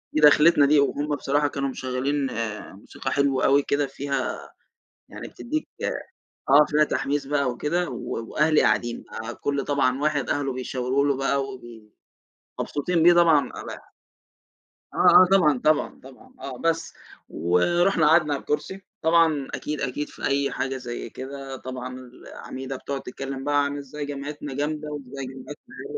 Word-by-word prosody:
ودَخلِتنا 150 0 +6
دي 145 +1 +5
وهُم 145 +1 0
بصراحة 145 +1 +1
كانوا 140 -1 -2
مشغّلين 130 +2 -2 0.5
موسيقى 120 +6 -6
حلوة 140 -2 +1
أوي 140 +1 +4
كده 140 0 0
فيها 140 +1 -4 0.6
يعني - - -8
بتدّيك 310 +5 -4 0.8
آه، 145 +2 +7
فيها 150 +1 +3
تحميس 145 -1 -1
بقى 140 -3 +1
وكده 170 +7 -1
و 120 -1 -5
وأهلي 155 0 +3
قاعدين 120 0 0
بقى، 115 +2 -6
كل 140 -1 -2
طبعًا 135 -1 +1
واحد 150 -3 0
أهله 140 -2 -1
بيشاورو 130 +1 -1
له 140 -2 +1
بقى 135 0 0
وبي 120 -5 -11 0.7
مبسوطين 165 +3 0
بيه 175 +1 +8
طبعًا 160 -6 +5
ال - - -8 1.2
آه، - - -9 0.2
آه - - +7
طبعًا، 150 -9 +4
طبعًا، 155 0 +1
طبعًا 135 - -15
آه 130 -2 -7
بس، 165 +1 -1 0.4
ورُحنا 160 - +2
قعدنا 155 -2 +4
على 140 - -2
الكُرسي، 190 +6 -3 0.2
طبعًا 160 -4 +3
أكيد، 150 -1 -4
أكيد 135 +3 -3
في - - -7
أي 140 0 +1
حاجة 135 0 -2
زي 120 -2 -6
كده 135 +1 -7
طبعًا 130 0 -7
العميدة 130 +1 -8
بتقعُد 135 +1 -5
تتكلم 135 +1 -6
بقى 145 0 +2
عن 140 0 -3
إزاي 145 +1 -6
جامعتنا 145 0 -6
جامدة 150 +2 -3
وإزاي 135 -1 -6
جامعتنا 130 +3 -11
اللي 420 - -9
140 Hz, 150 wpm, -24 LUFS, 130-150 Hz, 1.2 s, بيه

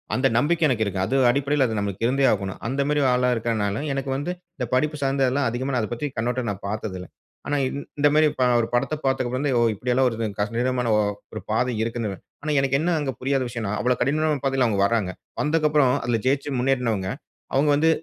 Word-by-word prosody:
அந்த 130 +1 +3
நம்பிக்கை 160 +6 +2
எனக்கு 120 -5 +1
இருக்கு. 100 -2 -3
அது 130 - -1
அடிப்படையில 140 +2 +2
அது 110 -1 -3
நமக்கு 100 +1 -3
இருந்தே 135 +3 +2
ஆகணும். 100 -2 -4
அந்த 135 +3 -1
மாரி 150 0 +1
ஆளா 125 0 +2
இருக்கனால 110 -3 -1
எனக்கு 135 0 -3
வந்து 145 +6 -3 0.3
இந்த 125 - -2
படிப்பு 150 +4 +1
சார்ந்ததுலாம் 135 -1 +1
அதிகமா 130 +3 -3
நான் 120 - +1
அத 110 - -3
பத்தி 135 +5 -3
கண்ணோட்டம் 120 0 -1
நான் 100 -1 -8
பார்த்ததில்ல. 100 -3 -4 0.4
ஆனா 145 - 0 0.4
இந்த 145 - +5
மாரி 155 0 +5
ப - - +4 0.2
ஒரு 115 - -2
படத்த 125 +3 +1
பார்த்ததுக்கு 130 -2 0
அப்புறம் 140 -3 +1
ஓ! - - +3
இப்படி 125 +5 -2
எல்லாம் 130 +1 +3
வருதுங் 115 -3 -3
கடினமான 120 +3 0
ஒ - - +4 0.3
ஒரு 110 - -5
பாதை 125 +3 +1
இருக்குன்னு. 115 -4 -3 0.3
ஆனா 155 - -1
எனக்கு 135 0 +2
என்ன 155 -4 0
புரியாத 135 0 0
விஷயம்ன்னா 110 -3 -3
அவ்வளோ 125 +1 +2
கடினமான 150 +2 +1
பாதையில 135 -2 +2
அவங்க 105 -3 0
வராங்க. 105 -5 0 0.3
வந்ததுக்கப்புறம் 150 -4 +3
அதில 120 -1 +1
ஜெயிச்சு 140 +2 +1
முன்னேருனவங்க, 120 -7 0 0.4
அவங்க 140 +3 +3
வந்து 160 +3 +3
125 Hz, 195 wpm, -24 LUFS, 115-140 Hz, 0.4 s, இந்த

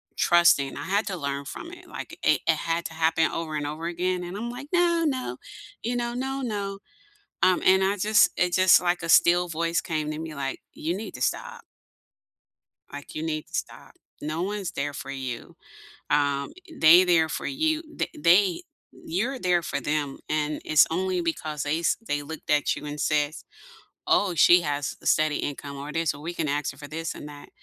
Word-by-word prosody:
trusting. 170 -6 +4
I - - -5
had 205 +3 +1
to 190 - -3
learn 140 -2 -3
from 335 - -8
it, - - -13
like, - - -8
it - - +4
it - - +4
had 165 +1 -2
to 165 - -5
happen 160 0 +2
over 160 -2 -4
and 145 -1 -3
over 155 +3 -5
again, 180 +1 -1
and 175 +3 -6
I'm 235 +3 -4
like, 250 +4 -8
"No, 345 -1 +3
no," 255 - -2 0.5
you 240 +2 -1
know, 240 0 -2
"No, 265 +2 -3
no." 200 -5 -3 0.6
Um, 185 -1 +4
and 190 0 +5
I 195 +2 +1
just 210 +2 +4
it 180 -1 +1
just 185 0 +6
like 175 +1 0
a 170 - -5
still 175 +2 +5
voice 165 +1 0
came 155 -4 -2
to 155 - -5
me, 160 -2 -6
like, 135 -1 -3
"You 165 +3 -3
need 210 +2 -7
to 130 - -9
stop." - - -3 1.3
Like, 145 0 -9
you 155 - -4
need 155 -1 -3
to - - -21
stop. - - -5 0.3
No 155 +3 -3
one's 195 -1 -3
there 145 -3 -3
for 140 - -7
you. 130 -3 -6 0.5
Um, 145 -1 +1 0.3
they 170 +4 +8
there 165 -3 +3
for - - -4
you, 315 +3 0
the - - -1
they 175 +3 +4 0.3
you're 235 +11 -3
there 180 -5 +2
for 140 - -3
them, 145 0 -2
and 150 0 -1
it's 155 -1 +5
only 185 +2 0
because 155 -3 -3
they 150 +3 0
s 170 - +2
they 145 -5 -1
looked 160 +2 -8
at 150 -1 +2
you 150 - -8
and 145 0 -6
says, 150 +1 0 0.6
"Oh, 195 -3 +3
she 175 +3 +7
has 145 -2 -2
a - - -12
steady 155 -1 +3
income 140 0 -5
or 140 +2 -7
this, 165 -2 0
or 145 - -11
we 170 +2 -5
can 165 - -2
ask 145 0 -1
her 130 - -18
for 145 - -8
this 165 +1 -4
and 150 - -8
that." 145 -1 -12
165 Hz, 205 wpm, -26 LUFS, 150-185 Hz, 1.3 s, they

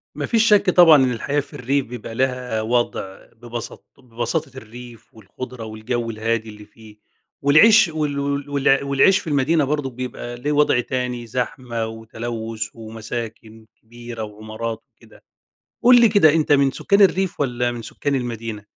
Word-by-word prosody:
ما - - -3
فيش 225 -1 +2
شك 205 -2 +4
طبعًا 175 -3 +7
إن 125 - 0
الحياة 140 +5 -1
في 140 0 -7
الريف 135 +2 -1
بيبقى 115 -1 -8
لها 125 -3 -1
وضع، 110 -4 -2
ببسط 120 0 -9
ببساطة 125 +3 -4
الريف 120 0 -12
والخُضرة 120 +3 -9
والجو 115 +2 -4
الهادي 110 0 -2
اللي 105 0 -12
فيه، 105 0 -17 0.4
والعيش 205 +10 +6
وال 150 -3 -2
وال 140 0 -3
وال 140 -1 +2
والعيش 140 +8 +3
في 190 - -10
المدينة 150 +2 +2
برضو 145 -1 -1
بيبقى 125 -1 -7
ليه 140 +5 -3
وضع 145 -4 +3
تاني، 125 -1 -3
زحمة 120 -1 -3
وتلوث 110 0 -5
ومساكن 110 0 -8 0.2
كبيرة 120 0 -9
وعمارات 110 +2 -6
وكده. - - -21 0.6
قل 245 0 +7
لي 230 - +6
كده، 195 -8 +5
أنتَ 155 -2 +1
من 140 -1 +4
سكان 200 +8 +1
الريف 190 -1 +2
والّا 125 -3 0
من 120 -1 -6
سكان 140 +5 -3
المدينة؟ 115 -4 -5
125 Hz, 155 wpm, -21 LUFS, 115-145 Hz, 0.6 s, طبعًا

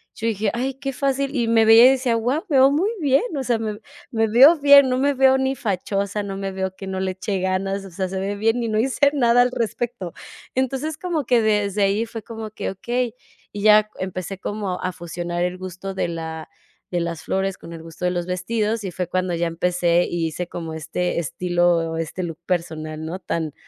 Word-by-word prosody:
Yo 225 - -3
dije: 215 -1 0
"Ay 255 +3 -2
qué 270 0 -4
fácil.", 275 +1 -1
y 235 -3 0
me 225 -1 +4
veía 225 +3 +9
y - - +7
decía: 255 -3 +1
"Guau, 250 - -1
me 290 - +1
veo 265 +1 +6
muy 335 +9 +1
bien, 275 +3 +3
o 270 - -2
sea, 235 -3 0
me 215 -2 -4 0.3
me 225 -2 +1
veo 270 +9 +7
bien. 280 -1 +8
No 255 - +1
me 285 +2 +2
veo 265 0 +4
ni 265 0 0
fachosa, 200 0 -2
no 195 -1 -5
me 195 -1 -4
veo 190 0 -3
que 190 0 -9
no 190 0 -3
le 190 0 -1
eche 190 +1 -3
ganas, 195 +1 -1
o - - -9
sea, 185 +2 -2
se 190 +1 -4
ve 200 +1 -2
bien 225 +3 +1
y 230 - -2
no 215 0 +1
hice 270 +4 +3
nada 245 -3 +4
al 250 0 +2
respecto". 230 -5 -3 0.4
Entonces, 270 +4 -1
como 335 -6 -2
que 240 -1 +3
desde 210 -2 +1
ahí 200 +3 +1
fue 225 -1 -8
como 225 0 -7
que: - - -4
"Okey", 240 +4 -2 0.4
y 205 - -6
ya 215 0 +6
empecé 185 0 -4
como 200 -3 -3
a 185 0 -2
fusionar 175 +1 -4
el 180 +1 -2
gusto 185 +1 -6
de 190 - -1
la 160 -1 -6 0.4
de 175 -1 0
las 170 -2 -4
flores 190 +3 -1
con 170 - -11
el 165 -1 -9
gusto 165 +2 -7
de - - +3
los 175 -1 -2
vestidos, 210 +4 -1
y 195 - -3
fue 180 0 -3
cuando 185 0 -1
ya 170 +1 0
empecé 175 +1 +1
y 170 -1 -1
hice 170 +2 -4
como 165 -2 -6
este 165 +3 -2
estilo 175 0 +1
o - - -3
este 165 +3 -4
look 165 -1 -6
personal, 160 -3 -3
¿no? 170 +4 -5
Tan 160 -5 -3
200 Hz, 225 wpm, -22 LUFS, 180-240 Hz, 0.4 s, veía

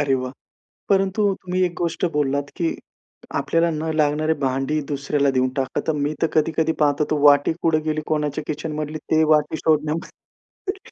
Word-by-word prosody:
अरे 140 -2 +2
वाह! 130 0 -3 0.6
परंतु 195 +1 +2 0.2
तुम्ही 185 0 -2
एक 175 - -1
गोष्ट 170 0 -1
बोललात, 145 -1 0
की 170 -3 0 0.7
आपल्याला 165 0 +1
न 160 +1 -2
लागणारे 155 +1 +2
भांडी 135 +4 0
दुसऱ्याला 140 0 +1
देऊन 130 -1 +1
टाका. 130 -1 -1
तर 160 - +2
मी 145 +2 -1
तर - - +5
कधी-कधी 160 +1 +2
पाहत 145 0 +2
होतो, 150 -1 +1
वाटी 145 +1 +5
कुठं 155 -2 +2
गेली 155 0 -1
कोणाच्या 150 -1 -1
किचनमधली, 155 0 -4
ते 160 +1 +1
वाटी 150 +1 +1
शोधन्यामध्ये 160 - -3
155 Hz, 160 wpm, -22 LUFS, 145-160 Hz, 0.7 s, तर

